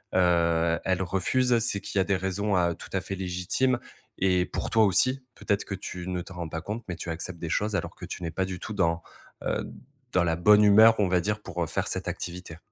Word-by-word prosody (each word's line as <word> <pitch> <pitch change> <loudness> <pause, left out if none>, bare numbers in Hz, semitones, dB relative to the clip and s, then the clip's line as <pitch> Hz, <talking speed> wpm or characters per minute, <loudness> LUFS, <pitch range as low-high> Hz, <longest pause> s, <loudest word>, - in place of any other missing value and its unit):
heu, 85 -2 +3
elle 95 0 +1
refuse, 115 +7 +1
c'est 110 -3 0
qu'il 100 - -2
y - - +5
a - - +3
des 100 - +1
raisons, 95 +2 -1
heu, 85 -1 +2
tout - - -11
à 95 - 0
fait 100 - -5
légitimes 95 +8 0 0.4
et 90 -1 +3
pour - - -4
toi 110 -1 +5
aussi, 130 +7 +2
peut-être 100 -1 -1
que - - -5
tu 90 -1 -7
ne 90 -1 -2
t'en 90 - -11
rends 85 -2 -5
pas 80 +1 -4
compte, 105 +7 -5
mais 90 - -3
tu 85 - -6
acceptes 85 +1 -5
des 85 - -4
choses 105 +4 0
alors - - -3
que - - -8
tu - - -7
n'es 85 - -2
pas 95 +4 -1
du 95 -1 -6
tout 110 - -6
dans, 85 -4 +1 0.4
heu, - - -1 0.5
dans 95 - +4
la 80 -1 +1
bonne 105 +4 +6
humeur, 110 +2 +7
on 100 - +3
va 90 0 +3
dire, 105 +3 -2
pour, - - -3
heu, - - -3
faire - - -2
cette - - -2
activité. 90 -2 -6
95 Hz, 245 wpm, -27 LUFS, 85-105 Hz, 0.5 s, humeur